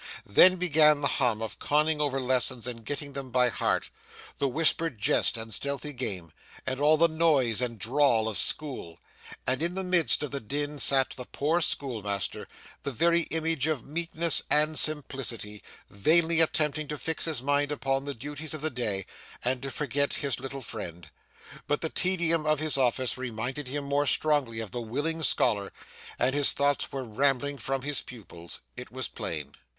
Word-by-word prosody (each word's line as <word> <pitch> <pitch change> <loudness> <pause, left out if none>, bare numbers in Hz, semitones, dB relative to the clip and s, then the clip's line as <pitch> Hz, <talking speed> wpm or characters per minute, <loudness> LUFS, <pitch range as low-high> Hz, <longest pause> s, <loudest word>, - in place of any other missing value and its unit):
Then 180 - +6
began 155 -4 +4
the 140 - +2
hum 120 -6 0
of 110 - -7
conning 150 +1 +1
over 140 -2 0
lessons 130 -1 +1
and 120 -2 -6
getting 145 +3 -5
them 135 -1 -5
by 125 0 +3
heart, - - -1 0.5
the 140 - +1
whispered 160 0 +1
jest 105 - +2
and 110 0 -6
stealthy 140 +6 -2
game, 100 - -4 0.3
and 130 0 -2
all 150 +2 +5
the 170 +2 +5
noise 150 -8 +2
and 120 -2 -2
drawl 120 0 +2
of 110 - +2
school; 130 - 0 0.5
and 130 - 0
in 170 +2 -1
the 190 - -1
midst 180 -4 +4
of 145 - -4
the 140 - -2
din 145 +5 -2
sat 135 -1 +2
the 125 - -6
poor 160 +5 0
schoolmaster, 105 - -2 0.3
the 140 - -4
very 170 +5 +2
image 160 -3 0
of 155 -6 -1
meekness 165 +1 +2
and 155 +1 +3
simplicity, 130 -8 -1 0.3
vainly 165 +10 +3
attempting 155 -1 +1
to 150 - -4
fix 160 +2 -1
his 155 -7 -2
mind 145 +1 +1
upon 135 -1 -1
the 140 -1 -4
duties 145 +5 -7
of 155 - -7
the 155 0 -1
day, 105 -7 -2 0.4
and 125 0 0
to 135 - -5
forget 140 0 -1
his 140 -3 -2
little 135 0 -7
friend. 85 -8 -8 0.6
But 145 - 0
the 160 - -1
tedium 170 -4 +1
of 155 0 +3
his 155 -1 +3
office 130 -1 +1
reminded 130 +3 -4
him 145 +2 -3
more 140 +1 0
strongly 135 -7 +2
of 110 - -7
the 120 - -4
willing 145 +8 -3
scholar, 110 -8 +2 0.5
and 125 +2 +1
his 145 -1 +4
thoughts 140 -1 0
were 135 -1 -4
rambling 135 +4 0
from 135 +3 -3
his 145 -1 -1
pupils 90 -8 -10
it - - -9
was - - -3
plain. - - -5
140 Hz, 175 wpm, -28 LUFS, 125-155 Hz, 0.6 s, Then